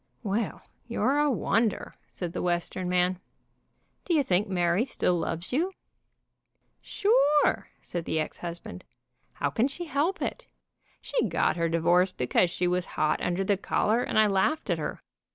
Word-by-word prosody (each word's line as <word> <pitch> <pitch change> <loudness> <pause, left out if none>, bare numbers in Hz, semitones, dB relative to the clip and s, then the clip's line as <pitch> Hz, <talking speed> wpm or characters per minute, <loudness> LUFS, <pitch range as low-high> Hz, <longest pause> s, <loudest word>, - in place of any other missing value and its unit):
"Well, 210 0 -2 0.2
you're 245 +4 +1
a 295 0 +3
wonder," 225 -3 0
said 175 -2 -6
the - - -3
Western 180 +1 -1
man. 180 0 +2 0.8
"Do 345 - 0
you 295 - +4
think 195 -2 +1
Mary 175 +2 +2
still 250 -8 0
loves 170 +4 -3
you?" 340 +8 +1 1.1
"Sure!" 400 -9 +2
said 170 -2 -4
the 160 - -1
ex 155 - -3
husband. 170 - -7 0.5
"How 145 - -1
can 225 - +2
she 345 +5 -6
help 315 +5 0
it? - - -4 0.6
She - - 0
got - - +1
her 170 -1 0
divorce 175 +3 +3
because 125 +8 +2
she 180 +1 -1
was 180 0 0
hot 155 - +1
under 180 +2 0
the 200 0 +1
collar, 220 +4 +1
and - - -2
I 215 - +6
laughed 205 +10 +1
at - - 0
her. - - -5
190 Hz, 160 wpm, -27 LUFS, 175-255 Hz, 1.1 s, I